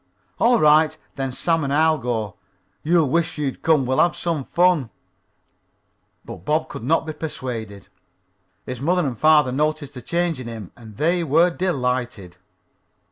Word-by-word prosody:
"All 240 0 +4
right. 155 +1 +4 0.2
Then 135 -2 -3
Sam 165 +4 0
and 140 - -2
I'll 155 +1 +3
go. 115 -4 -3 0.5
You'll 165 -1 +2
wish 165 +4 0
you'd 140 -3 -3
come. 155 -5 +3
We'll 130 +1 0
have 175 - +3
some 165 -5 -2
fun." 175 -8 +2 1.4
But 115 - -8
Bob 155 +2 0
could - - -7
not 160 +7 +1
be 155 - -5
persuaded. 115 -10 -6 0.8
His 125 -1 -6
mother 175 +3 +1
and 130 -3 -2
father 150 0 +4
noticed 150 +1 -1
the 125 - -9
change 170 +1 -1
in 125 - -7
him, 110 -5 -8
and 110 -3 -14
they 170 +3 +1
were 165 +4 +3
delighted. 125 - -2
150 Hz, 155 wpm, -22 LUFS, 125-165 Hz, 1.4 s, All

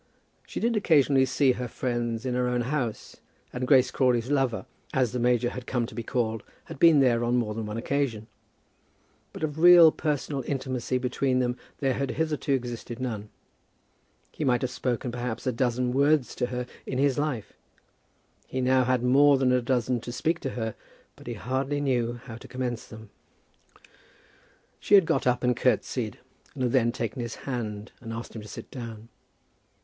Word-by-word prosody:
She - - -5
did 235 0 +1
occasionally 145 -9 +4
see 135 +1 +3
her 125 0 -3
friends 120 -1 -2
in 125 - -1
her 125 0 +1
own 125 0 0
house, 125 -3 -3 0.4
and 125 0 -3
Grace 130 -2 +5
Crawley's 125 -1 +1
lover, 135 -5 +1 0.3
as 130 -4 +2
the 125 - -2
major 120 0 +2
had 125 -1 -8
come 120 -2 0
to - - -10
be 115 - -4
called, 115 -2 -1 0.2
had - - -10
been 165 -4 +7
there 120 -3 +3
on 120 +1 +1
more 115 -3 0
than 110 0 -4
one 105 +1 -4
occasion; 120 -3 -1 1.1
but - - -8
of 155 0 -2
real 175 -1 +9
personal 145 -3 -2
intimacy 130 -2 -2
between 130 +1 0
them 125 -1 +1 0.3
there 135 -2 +2
had 135 +1 -2
hitherto 150 0 -1
existed 120 -2 -3
none. 110 -5 -4 1.0
He - - -5
might 125 -2 +2
have 125 - -1
spoken, 125 -1 -2
perhaps, 120 -1 -4
a 130 - +2
dozen 125 0 0
words 140 0 +3
to 125 - -1
her 125 0 -3 0.2
in 130 - -3
his 140 0 +2
life. 145 -8 -2 0.9
He - - -6
had 130 - 0 0.4
now - - +1
more 140 +2 +6
than 130 -1 +2
a 125 0 +3
dozen 120 -1 0
to 120 - -6
speak 165 +6 -1
to 135 - -3
her, 110 -2 -2 0.4
but - - -15
he - - -4
hardly 135 +3 -2
knew 125 -4 0
how 115 -4 -8
to - - -12
commence 125 -2 -4
them. 110 -1 -12 1.7
She 205 - +4
had 195 -4 +7
got 135 -4 0
up 125 0 +1
and 125 0 +2
curtseyed, - - 0 0.4
and 130 - -3
had 125 - +1
then 120 -3 +3
taken 120 0 -4
his 120 -1 -5
hand 110 -5 -4
and 115 -2 -7
asked 115 +1 -7
him 110 - -6
to 105 - -11
sit - - -9
down. 115 -3 -8
125 Hz, 185 wpm, -27 LUFS, 120-135 Hz, 1.7 s, real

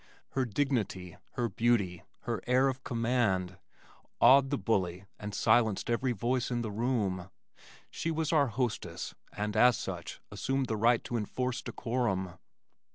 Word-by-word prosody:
Her 135 -1 0
dignity, 110 - -1 0.2
her 120 -2 0
beauty, 100 -5 +1 0.2
her 115 -5 -3
air 130 +2 +4
of 130 0 -5
command, 115 -7 0 0.6
awed 135 +2 +7
the 140 - 0
bully 95 -6 -1
and 105 -1 -5
silenced 110 -1 +3
every 125 +2 +1
voice 120 +3 0
in 120 -1 -1
the 110 - -3
room. 100 -5 -1 0.6
She 165 - -3
was 160 -1 -1
our 145 -3 +4
hostess 120 0 -3 0.2
and 105 +1 -3
as 125 +2 +6
such - - -5
assumed 135 0 -1
the 115 - -2
right 115 +2 +3
to 120 - -2
enforce 125 +4 -2
decorum. 100 -7 -2
120 Hz, 145 wpm, -31 LUFS, 100-130 Hz, 0.6 s, awed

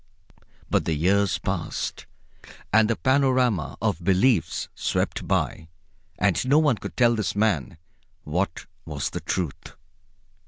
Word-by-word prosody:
But - - +1
the 80 - 0
years 95 +4 +2
passed, - - -4 0.7
and 110 0 +5
the 115 - +2
panorama 130 - +1
of 100 -6 0
beliefs 95 +3 +2
swept - - -2
by, 80 - -1 0.5
and 95 -4 +2
no 140 +3 +5
one 150 -7 +3
could - - -8
tell 120 -1 +5
this 110 -3 -2
man 100 -9 0 0.5
what 85 +3 -2 0.2
was 75 -3 -4
the - - -4
Truth. 85 -6 -4
100 Hz, 125 wpm, -25 LUFS, 85-120 Hz, 0.7 s, and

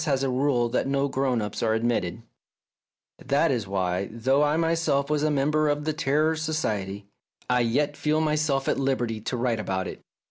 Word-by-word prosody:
has 135 -3 +1
a 135 - +1
rule 125 -2 +1
that 115 - -1
no 140 +1 +1
grown 130 -4 0
ups 105 0 -5
are 110 -1 +2
admitted! 115 -4 -1 0.5
" - - -67
That 145 +3 +3
is 115 -6 -1
why, 95 -1 -1
though 130 +5 +1
I 150 +1 +2
myself 165 -4 +1
was 150 -1 +1
a 155 - +2
member 150 +1 +2
of 145 0 -1
the 155 - 0
Terror 155 +1 +1
Society, 105 -12 -2 0.4
I 125 0 +2
yet 145 +5 +1
feel 155 +1 0
myself 150 -3 0
at - - +1
liberty 120 -5 -1
to 125 +3 -3
write 120 -2 0
about 95 -3 -2
it. - - -8
135 Hz, 190 wpm, -26 LUFS, 115-150 Hz, 0.5 s, That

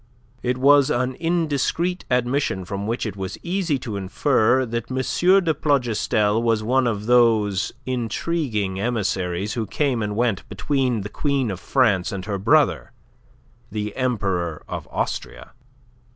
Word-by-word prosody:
It 125 0 -1
was 140 +1 +5
an 125 +1 0
indiscreet 170 +1 0
admission 125 -6 0
from 100 +2 -4
which 115 +2 -2
it 105 -3 -4
was 95 -1 -5
easy 175 -4 0
to 110 -4 -4
infer 120 +5 +2
that 115 -1 -4
M. 130 - -3 0.5
de 165 -2 +2
Plougastel 115 -6 +1
was 115 -2 +1
one 130 +3 +2
of 105 -3 -2
those 110 -5 +3
intriguing 120 - -2
emissaries 100 -4 -1
who 115 -3 -3
came 135 0 0
and 105 -1 -2
went 115 -4 -1
between 130 -6 0
the 100 - -6
Queen 135 -1 -1
of 95 - -5
France 110 -7 +2
and 95 -2 -5
her 100 -2 -3
brother, 95 - +2 0.8
the 105 0 -4
Emperor 95 - -1
of - - -6
Austria. - - -4
115 Hz, 140 wpm, -22 LUFS, 105-130 Hz, 0.8 s, was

